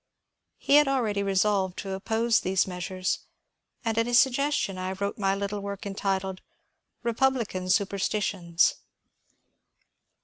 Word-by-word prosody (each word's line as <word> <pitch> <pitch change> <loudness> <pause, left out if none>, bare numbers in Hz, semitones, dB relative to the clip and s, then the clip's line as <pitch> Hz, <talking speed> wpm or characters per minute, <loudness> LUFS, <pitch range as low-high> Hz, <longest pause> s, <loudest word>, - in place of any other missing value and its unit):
He 285 - +4
had 295 -1 +5
already 230 -7 0
resolved 195 -1 +1
to 195 - -5
oppose 220 +4 +1
those 185 0 +1
measures, 185 0 -3 0.7
and 225 0 +1
at 230 - +1
his 240 0 +5
suggestion 270 -7 +1
I 185 +1 -3
wrote 200 +2 -3
my 195 -1 +1
little 200 +1 -3
work 200 0 -6
entitled 195 -1 -2
^* - - -42 0.6
Republican 235 -6 0
Superstitions." 195 -3 +1
200 Hz, 125 wpm, -27 LUFS, 190-230 Hz, 0.7 s, had